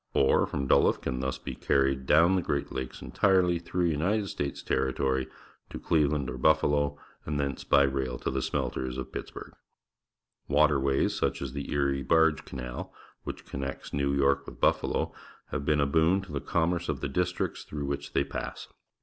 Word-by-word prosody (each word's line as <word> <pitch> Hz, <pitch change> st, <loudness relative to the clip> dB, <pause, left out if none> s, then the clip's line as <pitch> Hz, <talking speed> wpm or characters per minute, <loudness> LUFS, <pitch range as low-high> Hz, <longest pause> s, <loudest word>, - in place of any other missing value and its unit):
Ore 65 Hz, -, +4 dB
from 70 Hz, -, -3 dB
Duluth -, -, +3 dB
can 65 Hz, -, -3 dB
thus 65 Hz, 0 st, -2 dB
be 65 Hz, -, -6 dB
carried 70 Hz, -1 st, +1 dB
dovm 85 Hz, +5 st, +5 dB
the 95 Hz, -, +2 dB
Great 70 Hz, -4 st, -2 dB
Lakes 65 Hz, -1 st, -5 dB
entirelj^ 90 Hz, -3 st, +2 dB
through 90 Hz, +1 st, -1 dB
United 95 Hz, +6 st, 0 dB
States 70 Hz, -3 st, -4 dB
territory' 65 Hz, 0 st, 0 dB, 0.4 s
to -, -, -6 dB
Clei'eland 75 Hz, -3 st, +1 dB
or 65 Hz, 0 st, -5 dB
Buffalo, 75 Hz, -1 st, +3 dB, 0.3 s
and 75 Hz, -1 st, -2 dB
thence 70 Hz, -2 st, -2 dB
by 70 Hz, -, +5 dB
rail 65 Hz, -2 st, -1 dB
to -, -, -3 dB
the 65 Hz, 0 st, -1 dB
smelters 65 Hz, 0 st, -2 dB
of 65 Hz, 0 st, -5 dB
Pittsburgh. -, -, -7 dB, 1.0 s
Waten^ays, 70 Hz, -2 st, +3 dB
such -, -, -1 dB
as 70 Hz, -2 st, -5 dB
the 70 Hz, 0 st, -5 dB
Erie 70 Hz, -1 st, +1 dB
Barge 80 Hz, +1 st, +3 dB
Canal, 60 Hz, -1 st, -6 dB, 0.3 s
which -, -, -6 dB
connects 70 Hz, 0 st, -5 dB
Xew 70 Hz, 0 st, 0 dB
York 70 Hz, 0 st, +2 dB
with -, -, -10 dB
Buffalo, -, -, +1 dB, 0.4 s
have 70 Hz, -, -3 dB
been 75 Hz, 0 st, +2 dB
a 70 Hz, -, +3 dB
boon 80 Hz, +6 st, +3 dB
to 95 Hz, -, -11 dB
the 70 Hz, -2 st, -3 dB
commerce 85 Hz, +1 st, 0 dB
of 70 Hz, -4 st, -2 dB
the -, -, -1 dB
districts 90 Hz, +6 st, -2 dB
through 75 Hz, -1 st, -5 dB
wliich 70 Hz, 0 st, -4 dB
they 70 Hz, -, +3 dB
pa.ss. -, -, -6 dB
70 Hz, 175 wpm, -28 LUFS, 65-80 Hz, 1.0 s, dovm